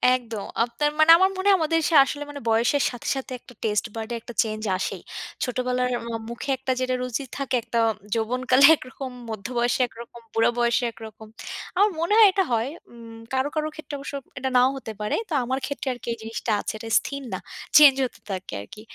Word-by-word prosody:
একদম। 230 -5 -5 0.2
আপনার 240 +5 0
মানে 310 +1 +8
আমার 380 +2 +4
মনে 375 +1 -1
হয় 390 - +6
আমাদের 325 +1 +2
সে 330 - +1
আসলে 290 +2 -4
মানে 285 -1 -8
বয়সের 235 +5 +3
সাথে, 245 - -8
সাথে 265 -1 -6
একটা 245 - -16
taste 210 +1 0
bud 220 -1 -4
এ - - -1
একটা 240 - -10
চেঞ্জ 215 -1 -5 0.2
আসেই। - - -4 0.4
ছোটবেলার 250 0 -1 0.2
ম - - -5 0.2
মুখে 235 +4 -6
একটা 265 0 -2
যেটা 255 0 0
রুচি 250 +2 -3
থাকে 275 -2 -1
একটা, 235 - -1 0.3
যৌবনকালে 255 +4 +3
একরকম, 260 -1 -8 0.2
মধ্যবয়সে 235 +4 -1
একরকম, 235 0 -12
বুড়া 225 - +3
বয়সে 240 +1 +2
একরকম। 220 -1 -11 0.5
আমার 405 +3 +4
মনে 340 +5 +1
হয় 445 -2 +9
এটা 385 0 +2
হয়। 230 +2 +1 0.2
উম 230 -1 -12 0.2
কারো, 260 +1 +1
কারো 310 0 0
ক্ষেত্রে 310 -1 -9
অবশ্য 280 - -7 0.3
এটা 265 +1 -1
নাও 250 +1 +5
হতে 240 -4 -7
পারে। 210 - 0
তো - - -3
আমার 260 +2 -1
ক্ষেত্রে 280 -1 -5
আরকি 245 - -12
এই - - -8
জিনিসটা 225 +1 -4
আছে। - - -4
এটা 225 +1 -8
স্থির 280 0 -6
না, - - -2 0.4
চেঞ্জ 290 -3 +9
হতে 245 - -8
থাকে 190 -1 -5
আরকি। 210 - -11
250 Hz, 200 wpm, -24 LUFS, 230-280 Hz, 0.5 s, হয়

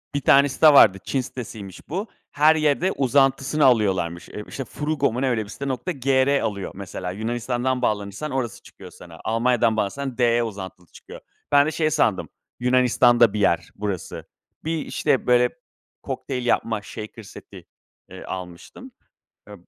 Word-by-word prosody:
Bir 145 - 0
tane 140 +1 +5
site 155 +4 +4
vardı; 95 -8 +7
Çin 135 - -1
sitesiymiş 110 -7 -9
bu. 190 +8 -3 0.2
Her 155 +2 +4
yerde 155 +5 +1
uzantısını 135 +2 +2
alıyorlarmış. 95 -8 +1
Eee, 105 - -7
işte, 135 - -6
Fruugo 150 -4 -1
mu 125 - -3
ne, 135 - +1
öyle 110 -3 0
bir 100 - -14
site. 140 +4 -6
Nokta 130 +7 -3
gr 135 0 +2
alıyor 100 -2 -3
mesela. 90 -1 -6
Yunanistan'dan 120 +4 -2
bağlanırsan 105 +6 -2
orası 125 -5 -3
çıkıyor - - -14
sana, 85 -2 -14
Almanya'dan 115 0 +1
bağlanırsan 130 +5 -3
de 120 -1 +2
uzantılı 95 -5 -8
çıkıyor. - - -13 0.3
Ben 145 0 +6
de - - -1
şey 155 0 0
sandım, 110 -10 +1 0.3
Yunanistan'da 125 -2 +4
bir 105 - -2
yer 85 -4 +1
burası. 100 -4 -5 0.4
Bir, 160 +1 -2
işte, 145 -4 0
böyle, 125 0 +4 0.5
kokteyl 130 -2 -4
yapma, 115 -3 0
shaker 110 +1 -9
seti, - - -13 0.4
eee, - - -10
almıştım. 90 - -9 0.6
Eee, - - -11
125 Hz, 155 wpm, -23 LUFS, 105-140 Hz, 0.6 s, vardı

